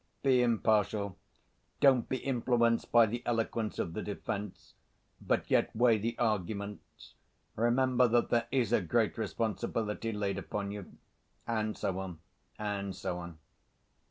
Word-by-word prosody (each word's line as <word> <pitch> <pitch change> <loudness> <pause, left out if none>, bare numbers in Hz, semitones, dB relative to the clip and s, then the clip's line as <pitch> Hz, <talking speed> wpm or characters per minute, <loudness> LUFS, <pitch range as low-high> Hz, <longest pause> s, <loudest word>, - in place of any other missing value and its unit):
"Be 130 -2 +4
impartial, 110 -4 +1 0.6
don't 130 -4 +4
be 130 - 0
influenced 120 -3 +1
by 120 -1 +7
the 120 +3 -3
eloquence 115 -2 -1
of 85 - -2
the - - -3
defense, 100 -1 -5 0.5
but - - -1
yet - - +2
weigh 115 -1 +4
the 115 +3 -2
arguments. 105 -2 -3 0.4
Remember 125 +2 +3
that 120 +1 +2
there 115 -1 +2
is 120 -4 +1
a 110 - +4
great 110 +5 +1
responsibility 110 +2 -2
laid 100 -2 -2
upon 100 0 -4
you," 100 -2 -9 0.5
and 110 -2 -1
so 95 0 -2
on 90 -4 -6 0.4
and 100 -2 -3
so 90 -2 -3
on. 85 -2 -8
110 Hz, 135 wpm, -31 LUFS, 100-120 Hz, 0.6 s, by